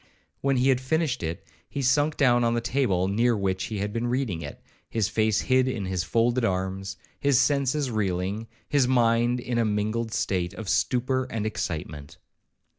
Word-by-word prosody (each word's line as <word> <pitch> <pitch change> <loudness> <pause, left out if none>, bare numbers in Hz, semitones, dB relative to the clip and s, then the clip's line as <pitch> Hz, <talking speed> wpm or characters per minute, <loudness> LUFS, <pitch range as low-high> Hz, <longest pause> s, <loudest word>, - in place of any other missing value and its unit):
When 135 -1 +1
he 130 +2 +3
had 130 -1 +3
finished 150 -1 0
it, 80 0 -4 0.2
he 140 - -3
sunk 145 +4 +2
down 120 -4 +4
on 115 0 +2
the - - +1
table 115 -7 +1
near 115 +4 +2
which 95 -1 -1
he 110 - -4
had 105 +1 -3
been 115 +1 -1
reading 120 -9 -1
it, 70 - -8 0.3
his 110 -4 0
face 110 -1 +1
hid 130 0 +2
in 115 -6 -2
his 95 -1 -1
folded 120 +3 +1
arms, 95 -1 -2 0.2
his 140 -3 +3
senses 140 0 +1
reeling, 100 +1 -2 0.2
his 140 -4 +2
mind 120 -1 +3
in 120 -1 -2
a - - +3
mingled 110 +2 -1
state 90 -4 -1
of 110 - -7
stupor 125 +10 +1
and 110 -4 -4
excitement. 75 -8 -4
115 Hz, 180 wpm, -26 LUFS, 95-130 Hz, 0.3 s, down